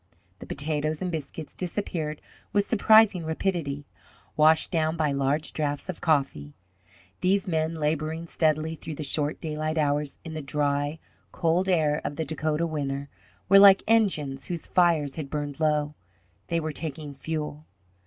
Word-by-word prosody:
The - - -10
potatoes 150 +2 -1
and 180 - -2
biscuits 155 -1 -6
disappeared 170 -5 -3 0.3
with 205 0 +3
surprising 220 -4 +5
rapidity, 160 -3 -2 0.5
washed 155 +3 +4
down 160 -1 0
by 155 -2 +1
large 140 +2 0
drafts 145 +2 -2
of 180 - -5
coffee. 135 - 0 0.6
These 190 +1 +2
men, 160 -1 0
labouring 155 +1 -2
steadily 160 -1 0
through 160 -1 -7
the 155 - -5
short 150 +1 0
daylight 155 0 -3
hours 145 -1 0
in 160 - -6
the 155 - -4
dry, 145 +2 -1 0.3
cold 175 +3 +1
air 155 -4 +2
of 145 - -4
the 160 - -2
Dakota 155 +2 -1
winter, 140 -3 -3 0.4
were 195 +1 +8
like 195 -1 +8
engines 155 -12 +1
whose 170 -2 -4
fires 165 -6 +2
had 150 -4 -5
burned 145 -1 -4
low 150 -1 +1 0.5
they 170 -1 0
were 155 -1 -3
taking 150 -1 -5
fuel. 150 +1 -5
155 Hz, 150 wpm, -26 LUFS, 145-165 Hz, 0.6 s, were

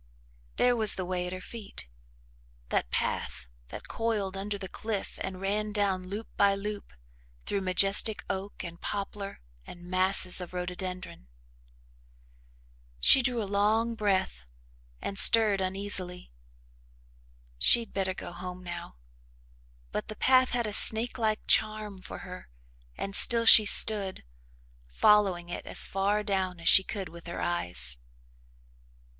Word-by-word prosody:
There 245 0 +2
was 220 -3 +4
the 185 - -5
way 180 0 -4
at - - -7
her 185 - -7
feet 205 - -8 0.8
that - - -2
path 65 +1 -4 0.2
that - - -11
coiled 215 -4 -3
under 200 +1 -5
the 195 -1 -8
cliff 215 0 -6
and 185 -1 -6
ran 210 +2 -3
down 195 -3 -2
loop 205 +4 -7
by 200 -1 +3
loop 205 - -7 0.5
through 200 - -3
majestic 195 +3 +3
oak 195 +2 -6
and 170 0 -10
poplar 200 0 -7 0.2
and 175 - -13
masses 185 0 +2
of 180 0 -10
rhododendron. 180 - -7 1.7
She 265 - +5
drew 245 -3 -1
a - - -5
long 220 +3 0
breath 195 - -2 0.6
and 195 - -1
stirred 215 -4 +7
uneasily 185 - -4 1.3
she'd 230 - +3
better 190 -1 -3
go - - -9
home 180 +1 -9
now 175 - -9 1.0
but 105 - -5
the 215 - -8
path 255 +3 +2
had 240 -1 -1
a 210 - -5
snake 225 +4 +4
like 215 -1 -2
charm 215 -2 0
for 185 - -10
her 180 - -11 0.5
and 195 0 -3
still 230 -1 +6
she 215 -2 +8
stood, 200 - +4 0.6
following 180 - +1
it 175 - -8
as - - +2
far 200 +2 -2
down 190 -3 -3
as 165 - -6
she 190 - +6
could 195 -1 -7
with 170 +1 -14
her 170 - -7
eyes. 90 - 0
195 Hz, 140 wpm, -27 LUFS, 180-210 Hz, 1.7 s, she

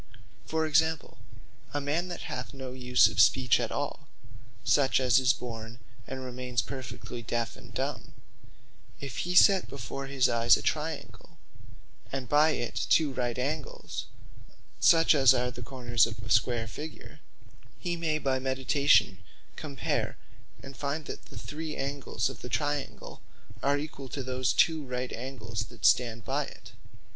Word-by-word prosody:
For 160 0 0
example, 160 -2 +1 0.6
a - - +2
man 150 +5 -1
that 175 - -6
hath 135 -4 -6
no 130 -1 -6
use 125 -1 +4
of 110 -1 -4
Speech 125 0 +4
at - - -2
all, - - -4 0.6
(such, 135 -2 +3
as 130 0 +4
is 125 -1 +4
born 115 -2 -6 0.3
and 130 -1 -6
remains 125 -2 -2
perfectly 125 -2 -7
deafe 115 0 -2
and - - -14
dumb,) - - -4 0.9
if 135 -4 -6
he 180 +1 -2
set 195 0 +6
before 135 +1 -6
his 135 -2 +2
eyes 115 0 +5
a - - -7
triangle, - - -4 0.7
and 135 -2 -4
by 150 +4 +5
it 120 -6 -2 0.2
two 150 -4 +4
right 125 -2 -2
angles, 145 +4 -4 0.7
(such 165 -1 +6
as 135 -3 +6
are 125 0 0
the 125 - -9
corners 120 -2 +1
of 110 -2 -7
a 110 - -6
square 115 0 +3
figure,) 150 +8 -9 0.6
he 175 -1 -2
may 160 -2 0
by 135 -3 0
meditation 135 +2 +3 0.4
compare - - -2 0.5
and 135 0 -9
find, 145 +3 -3
that - - -7
the - - -12
three 155 +1 -5
angles 140 0 -2
of 135 -4 -7
that 125 - -7
triangle, 145 -2 -3 0.4
are 140 +2 +2
equall 145 -2 -6
to 135 - -4
those 130 0 0
two 160 -2 +3
right 125 -1 -4
angles 115 -3 -5
that 115 -1 -8
stand 115 -3 +3
by - - 0
it. - - -13
130 Hz, 155 wpm, -29 LUFS, 120-145 Hz, 0.9 s, set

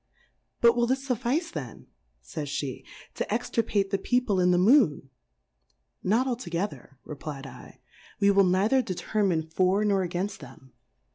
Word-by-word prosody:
But 235 0 +6
will 240 0 +2
this 265 +2 -1
fuiSice 255 - -1
then, 130 -8 -7 0.4
fajs - - -5
fie^ 135 -3 -5 0.3
to - - -4
extirpate 215 -3 0
the 195 - 0
People 245 -6 +1
in 180 0 +3
the 180 - +4
Moon? 185 - +3 0.9
Not 225 +7 +2
altogether, 175 - -4
r^p/jV/, 135 -3 -9 0.4
we 200 -1 +4
will 200 0 +5
neither 195 +8 +3
determine 185 -4 -1
for, 185 +5 +1
nor 200 -2 +2
againft 185 +4 -3
them. 130 -2 -14
195 Hz, 135 wpm, -27 LUFS, 160-235 Hz, 0.9 s, But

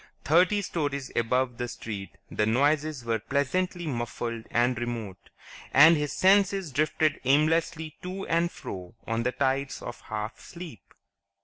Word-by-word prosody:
Thirty 180 +7 +4
stories 145 -6 -2
above 125 +1 +1
the 120 - -1
street 105 -4 -6 0.2
the 105 - +1
noises 145 +2 +1
were 115 -1 0
pleasantly 145 - -1
muffled 120 -3 -4
and 120 +1 +2
remote, 115 -5 -5 0.4
and 155 +5 +8
his 150 -2 -1
senses 195 -3 +3
drifted 155 +2 +1
aimlessly 155 +3 +2
to 185 +2 -5
and 170 +1 +1
fro 90 +3 -8
on 115 +1 -1
the 125 +2 0
tides 135 +1 -1
of - - -8
half 110 +1 -5
sleep. 170 - -11
140 Hz, 135 wpm, -27 LUFS, 115-160 Hz, 0.4 s, and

